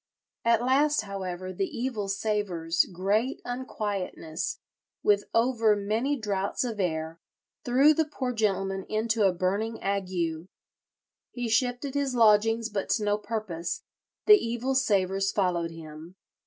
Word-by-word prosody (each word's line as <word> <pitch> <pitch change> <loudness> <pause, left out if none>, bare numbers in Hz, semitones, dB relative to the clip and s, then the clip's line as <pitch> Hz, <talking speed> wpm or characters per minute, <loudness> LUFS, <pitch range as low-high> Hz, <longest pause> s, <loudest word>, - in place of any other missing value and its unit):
"At 230 0 +3
last, 290 +2 +3
however, 185 -2 -5
the 190 +1 -1
evil 235 -5 -3
savours, 195 -5 0
great 205 +8 0
unquietness, 205 -9 -4 0.5
with 205 -1 +3
over 230 -2 +3
many 220 +8 0
draughts 200 -3 -1
of 230 -4 -4
air, 160 -2 -2 0.4
threw 270 +5 +5
the 320 +1 +1
poor 255 -4 -2
gentleman 195 -3 0
into 220 -1 +2
a - - +3
burning 200 +6 -1
ague. 180 -4 -2 0.8
He 245 -1 -4
shifted 245 +4 0
his 280 -3 -1
lodgings, 225 0 +4
but 200 -3 -3
to 215 - +1
no 205 0 +1
purpose; 205 -6 -4 0.4
the 420 -1 +7
evil 240 +3 -1
savours 195 -6 +1
followed 175 -4 0
him. 165 +1 -11
210 Hz, 130 wpm, -27 LUFS, 185-235 Hz, 0.8 s, the